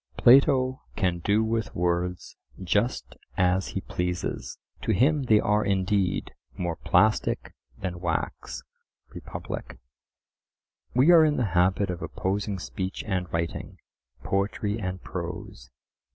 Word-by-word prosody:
Plato 130 0 +5
can 90 -4 0
do 105 +5 +2
with 110 -1 -2
words 90 +1 -1 0.3
just 105 +7 0 0.2
as 90 +1 +2
he - - -4
pleases; 90 0 -3 0.2
to - - 0
him 140 - +3
they 110 -3 +5
are 105 +1 +2
indeed 95 -1 0 0.3
"more 85 -2 -2
plastic 110 +7 +2 0.2
than 90 -2 -4
wax" 85 -2 -3 0.5
(Republic). - - -7 1.2
We 135 +7 +6
are 165 -2 +8
in 150 -1 +2
the 125 - +1
habit 95 +2 +2
of 90 0 -6
opposing 100 +1 -2
speech 95 +1 -4
and 95 -4 -2
writing, 85 0 -3 0.5
poetry 100 +2 -1
and 95 -2 -3
prose. - - -6
95 Hz, 120 wpm, -26 LUFS, 90-110 Hz, 1.2 s, are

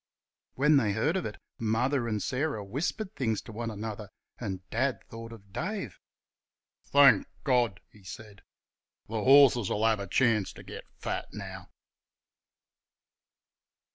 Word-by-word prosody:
When 150 +2 +5
they 110 -6 +2
heard 145 - +1
of 190 - -1
it 105 - -8 0.2
Mother 120 +3 +1
and 105 -3 -1
Sarah 130 -5 -1
whispered 175 - -3
things 110 -5 0
to - - -10
one 115 +1 -4
another, 105 -1 -6 0.3
and 95 -5 -5
Dad 130 +3 0
thought 115 0 -8
of 100 -4 -14
Dave. 175 - -4 0.9
"Thank 140 -1 +6 0.2
God!" 120 -8 +2
he 105 - -19
said, 100 +2 -10 0.6
"th' - - -35
horses'll 125 -5 +5
have 110 -2 +3
a 100 - -5
chance 115 -2 +2
ter - - -12
get - - -9
fat - - -3
now!" - - -8
115 Hz, 135 wpm, -29 LUFS, 105-135 Hz, 0.9 s, Thank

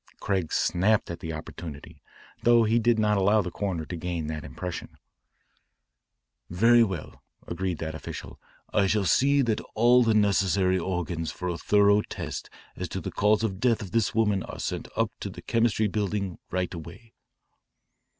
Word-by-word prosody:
Craig 95 -5 -1
snapped 100 +2 +2
at 85 - -6
the 80 - -5
opportunity, 75 -1 -8 0.4
though 120 -1 +5
he 115 +2 +3
did 120 0 +3
not 105 -1 +2
allow 100 +3 +4
the 90 - -5
coroner 95 -6 -3
to 90 - -6
gain 85 -1 -3
that 75 0 -4
impression. 90 -2 -7 1.5
"Very 115 +7 +5
well," 95 -7 -5 0.2
agreed 90 0 -3
that 80 0 -4
official, 80 - -8 0.2
" - - -34
I 100 -2 +3
shall 105 0 +1
see 140 - +4
that 110 -3 0
all 120 +3 +5
the 115 -2 +3
necessary 95 -2 +2
organs 85 -2 -3
for 90 0 -4
a 85 - -2
thorough 100 0 +4
test - - -6 0.3
as - - -5
to - - -4
the - - -5
cause 105 +1 +2
of 110 - +1
the 95 - -10
death 115 -2 +2
of 95 - -9
this 115 -3 +1
woman 105 -4 +2
are - - -8
sent - - -3
up - - +1
to - - -4
the - - -11
Chemistry 115 -2 +2
Building 100 -2 -2
right 90 0 -2
away." 85 +8 -10
100 Hz, 175 wpm, -27 LUFS, 90-110 Hz, 1.5 s, though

